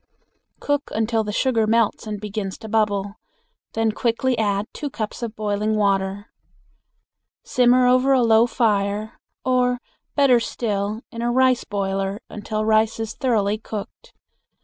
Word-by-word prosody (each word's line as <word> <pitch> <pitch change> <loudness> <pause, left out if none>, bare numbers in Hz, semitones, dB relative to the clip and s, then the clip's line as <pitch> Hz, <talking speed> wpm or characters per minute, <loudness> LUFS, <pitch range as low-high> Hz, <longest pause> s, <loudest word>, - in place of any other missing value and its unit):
Cook 290 0 -1
until 220 0 +1
the 210 - -4
sugar 225 -1 +1
melts 225 0 +1
and 210 -1 -4
begins 205 -2 -4
to 220 - -9
bubble; 205 -2 0 0.6
then 225 0 +1
quickly 240 +4 0
add 205 -2 0
two 290 - -4
cups 215 -3 -5
of 230 -2 -4
boiling 210 0 -1
water. 200 0 0 1.1
Simmer 250 0 +4
over 255 +2 +4
a 255 - +3
slow 225 0 +5
fire, 210 -2 0 0.3
or, 250 -1 +2 0.4
better 275 -4 +5
still, 210 -2 -2
in 230 - -6
a 240 0 0
rice 255 0 +3
boiler 195 0 -2
until 215 0 -3
rice 220 +1 +2
is 225 0 -3
thoroughly 215 -5 0
cooked. 215 -2 -8
220 Hz, 140 wpm, -22 LUFS, 205-240 Hz, 1.1 s, slow